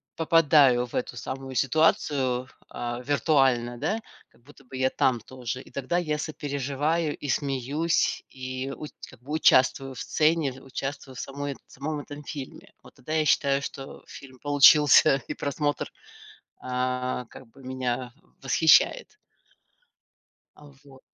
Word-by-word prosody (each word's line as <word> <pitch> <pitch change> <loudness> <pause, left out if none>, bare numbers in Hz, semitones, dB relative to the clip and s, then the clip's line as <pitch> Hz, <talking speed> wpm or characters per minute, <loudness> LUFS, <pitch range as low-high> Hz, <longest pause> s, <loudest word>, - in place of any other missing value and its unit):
попадаю 150 -6 +4
в - - -11
эту 125 -1 -3
самую 130 +1 -6
ситуацию, 135 -4 +1 0.2
а, 120 0 -5
виртуально, 135 -5 +2
да, 215 - -1 0.3
как 115 - -28
будто 140 +1 -18
бы 130 +1 -9
я 130 0 +2
там 125 -3 +1
тоже, 125 0 -6
и - - -16
тогда 140 +6 -2
я 155 -4 -1
сопереживаю, 145 +1 -2
и 145 - -6
смеюсь, 140 +4 0
и 130 +1 -5
уч 150 - -8 0.2
как - - -17
бы 145 +4 -7
участвую 135 -3 +3
в - - -8
сцене, 155 -3 +1
в 130 - -14
участвую 135 0 -6
в - - -8
самой 140 +1 -5
в - - -24
самом 150 +3 -4
этом 145 +1 -9
фильме. 145 -4 -9
Вот - - -16
тогда 155 +5 -7
я 155 -1 +2
считаю, 140 -1 +2
что 135 -1 -8
фильм 130 -2 -12
получился 145 -1 +6
и - - -3
просмотр, 145 +1 -2 0.7
а, 125 0 -2
как 125 +2 -14
бы 130 +4 -18
меня 125 -1 -3 0.3
восхищает. 300 - +3 1.4
А 145 -1 -16
вот. 135 -2 -17
135 Hz, 145 wpm, -26 LUFS, 130-150 Hz, 1.4 s, получился